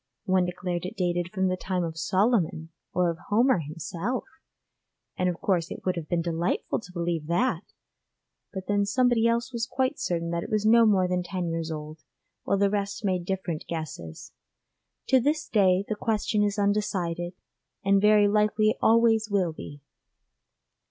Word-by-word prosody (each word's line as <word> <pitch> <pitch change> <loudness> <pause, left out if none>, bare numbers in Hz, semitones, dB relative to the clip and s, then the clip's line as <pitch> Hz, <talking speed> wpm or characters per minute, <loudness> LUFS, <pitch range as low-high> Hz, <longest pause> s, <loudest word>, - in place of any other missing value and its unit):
One 185 -2 +3
declared 180 -1 -3
it - - -9
dated 175 -2 0
from 190 -2 0
the 185 - 0
time 185 -1 -2
of 165 -1 -4
Solomon 185 -2 +1 0.2
or 180 -1 +2
of 165 - -9
Homer 235 +1 +4
himself, 165 - -4 0.9
and 180 0 +1
of 175 - -4
course 175 -4 0
it - - -8
would 185 - +1
have 165 -3 -6
been 170 -2 0
delightful 170 +1 -1
to 180 - -13
believe 170 -3 -2
that! 180 +1 0 0.9
but 190 -1 -6
then 205 0 +2
somebody 235 +1 +3
else 235 +2 0
was 235 0 -2
quite 260 +3 -1
certain 170 -1 -2
it 170 - -3
was 215 -1 0
no 230 +1 +6
more 190 -3 +3
than 180 0 0
ten 180 -1 -3
years 165 -1 -3
old, 155 0 -6 0.5
while 200 - +1
the 200 0 +2
rest 200 0 -2
made 185 -3 0
different 180 -4 -3
guesses. 155 - -6 0.8
To 260 - +6
this 295 +4 0
day 190 -2 +3
the - - -1
question 215 0 0
is 205 0 0
undecided, 190 -4 -1 0.5
and 195 0 +4
very 210 0 +5
likely 210 +1 +2
always 225 -1 +4
will 190 -5 +1
be. 145 -2 -10
190 Hz, 165 wpm, -26 LUFS, 170-215 Hz, 0.9 s, no